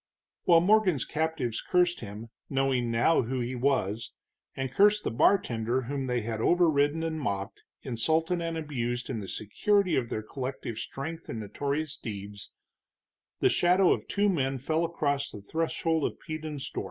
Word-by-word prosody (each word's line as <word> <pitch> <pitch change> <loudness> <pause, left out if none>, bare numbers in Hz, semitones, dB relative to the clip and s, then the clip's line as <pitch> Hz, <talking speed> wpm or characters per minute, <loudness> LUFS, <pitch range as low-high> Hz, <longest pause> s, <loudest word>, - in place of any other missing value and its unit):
While 170 -2 +6
Morgan's 190 - +3
captives 155 -7 -1
cursed 180 -1 +2
him, 110 +1 -8 0.2
knowing 135 -3 +1
now 115 +8 +3
who 130 +2 -2
he 120 +1 -2
was, 120 -5 0 0.4
and 135 -1 -3
cursed 205 +7 +4
the - - -1
bartender 120 - +2
whom 135 +1 -3
they 125 -1 0
had 110 0 -3
overriden 160 -1 +3
and 160 -1 -2
mocked, 100 -7 -3 0.2
insulted 160 +8 0
and 165 -1 -2
abused 125 -5 -3
in 115 - -3
the 100 - -6
security 185 - +1
of 120 -3 0
their 110 - -3
collective 125 -2 -5
strength 160 +8 -6
and 115 - -4
notorious 145 +8 -2
deeds, 100 -3 -7 0.9
the - - +5
shadow 180 +1 +4
of - - -5
two 205 +1 +1
men 135 -8 +1
fell 155 +6 0
across 145 -4 -1
the 105 - -9
threshold 160 +4 0
of - - -3
Peden's 155 -3 -5
door. - - -3
140 Hz, 160 wpm, -29 LUFS, 120-165 Hz, 0.9 s, While